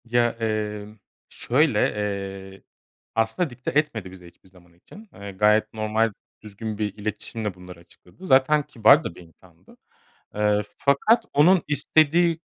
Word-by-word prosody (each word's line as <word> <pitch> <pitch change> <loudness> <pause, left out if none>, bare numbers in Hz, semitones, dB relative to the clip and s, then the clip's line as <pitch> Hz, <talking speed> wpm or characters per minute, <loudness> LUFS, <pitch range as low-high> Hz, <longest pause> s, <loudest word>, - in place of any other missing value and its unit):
Ya, 120 0 +2
emm, 105 -2 -4 0.3
şöyle, 135 -3 +1 0.7
eee, 95 - -18 0.5
aslında 115 +9 0
dikte 125 0 -6
etmedi 125 -10 -1
bize 90 -2 -13
hiçbir 85 +2 -21
zaman 90 -2 -22
için. 205 - -16
Eee, 100 0 -9
gayet 105 +2 +2
normal 110 0 0 0.3
düzgün 110 0 -7
bir 105 -2 -2
iletişimle 105 0 -4
bunları 90 -1 -13
açıkladı. 90 - -16
Zaten 140 +2 +4
kibar 115 -5 +4
da - - -6
bir - - -13
insandı. 85 +1 -21 0.6
Eee, 105 0 +1 0.2
fakat 220 - +2
onun 170 +5 +4
istediği 160 +3 +2
110 Hz, 135 wpm, -23 LUFS, 100-140 Hz, 0.7 s, Zaten